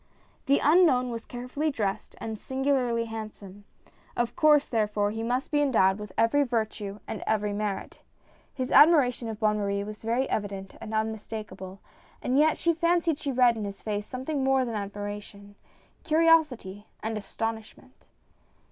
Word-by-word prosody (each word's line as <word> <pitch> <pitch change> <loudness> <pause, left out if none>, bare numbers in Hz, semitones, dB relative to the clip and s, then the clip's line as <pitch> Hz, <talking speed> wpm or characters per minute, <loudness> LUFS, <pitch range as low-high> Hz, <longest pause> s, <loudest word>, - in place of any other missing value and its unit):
The 280 +1 +5
unknown 290 -6 +4
was 230 -1 -6
carefully 250 +5 -3
dressed 210 -8 -3
and 220 -1 -5
singularly 260 -3 0
handsome; 210 -3 -8 0.5
of 240 0 -1
course 300 -2 +5
therefore, 210 -2 0
he 225 +1 -4
must 245 +3 -2
be 295 -1 +2
endowed 215 -8 +3
with 210 -2 -8
every 230 +6 +3
virtue 220 -5 -2
and 220 - -5
every 210 -1 0
merit. 205 -1 -4 0.5
His 255 -1 -4
admiration 280 -6 +5
of 220 -1 -6
Bonne 210 -1 +2
Marie 200 0 -1
was 210 +1 -8
very 235 +4 0
evident 195 -2 -4
and 225 - -7
unmistakable, 215 -3 -5 0.4
and 260 +3 +1
yet 310 +1 +4
she 335 - +2
fancied 335 -2 +1
she 285 - -2
read 250 -2 +4
in 220 - -4
his 200 -1 -7
face 210 -1 -3
something 265 +2 -3
more 265 -1 +3
than 235 - -4
admiration, 205 0 -6 0.5
curiosity 305 - +2 0.2
and 220 +1 -2
astonishment. 220 +1 -6
225 Hz, 150 wpm, -27 LUFS, 210-270 Hz, 0.5 s, The